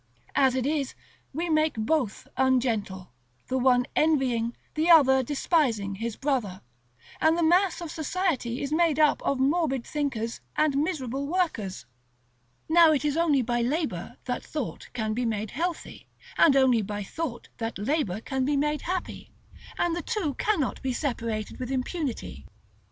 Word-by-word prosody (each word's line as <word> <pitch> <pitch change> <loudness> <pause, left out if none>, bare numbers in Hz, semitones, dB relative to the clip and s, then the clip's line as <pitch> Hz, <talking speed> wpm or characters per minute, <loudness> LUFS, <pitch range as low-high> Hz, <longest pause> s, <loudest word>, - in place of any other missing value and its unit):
As 265 -2 +3
it 260 -1 0
is, 285 -2 -1 0.4
we 330 +5 -2
make 310 -1 +2
both 225 +1 -1
ungentle, 235 - 0 0.4
the 260 - 0
one 250 -1 +4
envying, 255 -7 +1 0.2
the 315 +2 0
other 265 -5 +7
despising, 255 - 0
his 225 +2 -4
brother; 245 -10 -2 0.6
and 320 +1 +4
the 340 - +1
mass 355 +2 +3
of 335 -3 -5
society 315 -8 -1
is 280 +2 -2
made 330 -2 +3
up 305 -1 +3
of 275 - 0
morbid 270 -2 +1
thinkers, 250 -6 -3
and 305 -2 +2
miserable 280 -3 -1
workers. 280 - -2 0.8
Now 330 0 +6
it 300 -1 +1
is 295 -1 +1
only 310 -6 +3
by 240 +1 0
labor 250 - -2
that 250 - -3
thought 295 -6 -5
can 220 -3 -2
be 245 +3 -1
made 215 -2 -2
healthy, 340 +4 -4 0.3
and 285 - +5
only 260 -4 +4
by 205 0 -4
thought 255 +2 -5
that 225 0 -3
labor 215 - -1
can 265 +2 -2
be 285 +2 +1
made 295 0 0
happy, 365 +1 -4 0.5
and 345 -1 +1
the 350 - -2
two 370 -10 -2
cannot 330 - 0
be 265 -1 -1
separated 230 -6 -3
with 250 -1 -4
impunity. 270 +1 -4
270 Hz, 155 wpm, -27 LUFS, 235-315 Hz, 0.8 s, other